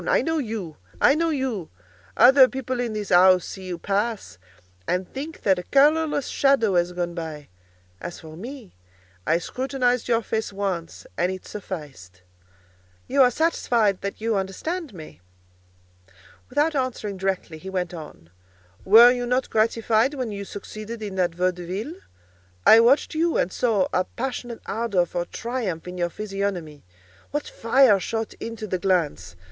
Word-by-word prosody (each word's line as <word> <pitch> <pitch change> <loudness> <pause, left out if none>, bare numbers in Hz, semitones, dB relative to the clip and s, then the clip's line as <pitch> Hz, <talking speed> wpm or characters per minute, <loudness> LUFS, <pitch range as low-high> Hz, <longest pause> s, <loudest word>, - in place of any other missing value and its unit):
I - - +3
know 325 0 0
you! 215 - -5 0.2
I - - +6
know 330 +2 +1
you! 260 - -2 0.5
Other 265 +1 +8
people 260 -1 -4
in 240 -3 -2
this 210 -1 -4
house 185 0 +6
see 190 -1 -8
you 180 -2 -4
pass, 200 - -2 0.5
and 180 0 -1
think 295 +4 -7
that 190 -3 +3
a - - -6
colourless 295 0 +3
shadow 270 -7 +2
has 175 0 +2
gone 175 -1 -3
by. 160 -4 -7 0.5
As 175 - -7
for 155 -1 -11
me, 235 - -9 0.5
I 165 - +4
scrutinized 250 +5 -1
your 230 -1 +2
face 220 -1 -2
once, 195 -4 -4
and 175 +2 +2
it 185 -1 -7
sufficed." 140 - -8 0.8
"You 275 +1 +3
are 250 - +7
satisfied 235 - +1
that 200 - -5
you 225 0 0
understand 275 - -3
me?" 155 - -12 1.3
Without 295 +5 +1
answering 240 -7 -2
directly, 185 -4 -3
he 190 - -8
went 180 -2 -3
on, 150 - -10 0.5
"Were 230 +5 +8
you 245 -1 -2
not 250 +1 0
gratified 225 +4 +2
when 255 -5 -3
you 200 -1 -5
succeeded 215 +3 -8
in 205 -2 -5
that 175 -2 +1
vaudeville? 180 - -2 0.7
I 225 - +9
watched 245 +5 +4
you 330 +1 +1
and 185 - 0
saw 215 -6 +1
a 185 - +2
passionate 245 -1 -5
ardour 205 -5 0
for 175 0 -3
triumph 220 -8 -4
in 180 0 -7
your 175 0 0
physiognomy. 195 -6 -4 0.5
What 295 0 -3
fire 230 -3 +4
shot 225 +3 -3
into 225 -1 -6
the 185 -3 -2
glance! 170 - 0
210 Hz, 155 wpm, -24 LUFS, 180-250 Hz, 1.3 s, I